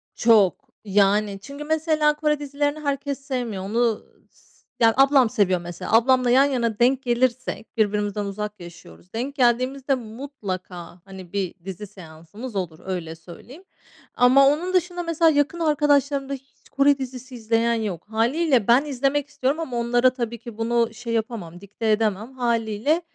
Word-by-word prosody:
Çok. 220 -2 +4 0.2
Yani, 200 0 +2
çünkü 280 +6 -8
mesela 310 -1 +1
Kore 300 -1 0
dizilerini 290 +1 -2
herkes 280 -1 -3
sevmiyor. 245 -8 -4
Onu 225 +2 0 0.3
s - - -28 0.3
ya 225 -1 +5
ablam 270 -3 +5
seviyor 185 -4 +1
mesela, 175 -1 -7
ablamla 250 +2 +4
yan 265 +3 +5
yana 235 -6 -1
denk 255 +2 +3
gelirsek, 245 -1 -1
birbirimizden 205 -1 0
uzak 210 +1 -5
yaşıyoruz, 175 +1 -14
denk 255 +5 -4
geldiğimizde 260 +2 +1
mutlaka 205 -8 -7
hani 190 -2 -12
bir 195 -3 -2
dizi 195 +2 -7
seansımız 185 +5 -11
olur, 175 -5 -4
öyle 175 -4 -4
söyleyeyim 180 - -13 0.5
ama 260 +3 +6
onun 330 +6 0
dışında 355 -1 0
mesela 330 -1 +3
yakın 290 +3 0
arkadaşlarımda 285 -3 +1
hiç 270 0 -12
Kore 280 0 +3
dizisi 255 -1 -7
izleyen 230 0 +1
yok 205 -7 -4
hâliyle 245 +2 +1
ben 250 +5 +5
izlemek 280 +1 -1
istiyorum 280 +2 -1
ama 255 -7 -4
onlara 240 +2 +3
tabii 235 -2 -4
ki 230 -1 -10
bunu 230 0 0
şey 230 0 -6
yapamam 215 -7 -4
dikte 210 +2 -2
edemem. 215 +2 0
Hâliyle 235 +5 0
240 Hz, 150 wpm, -23 LUFS, 210-275 Hz, 0.5 s, ama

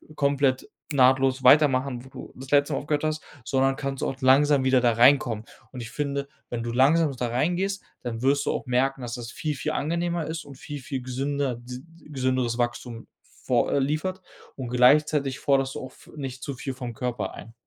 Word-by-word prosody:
komplett 140 -2 +1 0.3
nahtlos 130 0 +3
weitermachen, 130 -2 +4
wo - - -13
du - - -10
das 130 +1 -10
letzte 145 0 +3
Mal - - 0
aufgehört 145 0 -2
hast, 155 0 -1 0.2
sondern 135 +3 +1
kannst 135 -1 -4
auch - - -1
langsam 135 +1 +5
wieder 130 -1 +4
da 120 -2 +3
reinkommen. 120 -2 +4 0.3
Und 125 - -7
ich 115 0 -8
finde, 140 0 -2 0.2
wenn 120 -1 -3
du 120 - -3
langsam 145 +5 +4
da 125 -1 -2
reingehst, 175 +11 -1 0.2
dann 115 -2 -5
wirst 140 +2 +2
du - - +1
auch - - -3
merken, 130 +2 0
dass 120 -1 -5
das 120 -1 -7
viel, 155 -2 -3
viel 150 +3 -3
angenehmer 170 +2 -1
ist 160 0 -5
und 140 -2 -11
viel, 145 +1 -7
viel 130 0 -4
gesünder 135 +1 -2
d 125 +1 -9 0.3
gesünderes 130 -4 0
Wachstum 120 -1 -3
vor - - -1
äh, 140 - +3
liefert. 155 +7 -1 0.3
Und 130 -3 -6
gleichzeitig 135 +2 +3
forderst 135 -1 +1
du - - -5
auch 130 - -11
v - - -18
nicht 135 -3 -6
zu 140 - -4
viel 135 +1 -5
vom 125 -2 -6
Körper 125 0 -3
ein. 115 - -11
135 Hz, 195 wpm, -25 LUFS, 125-145 Hz, 0.3 s, langsam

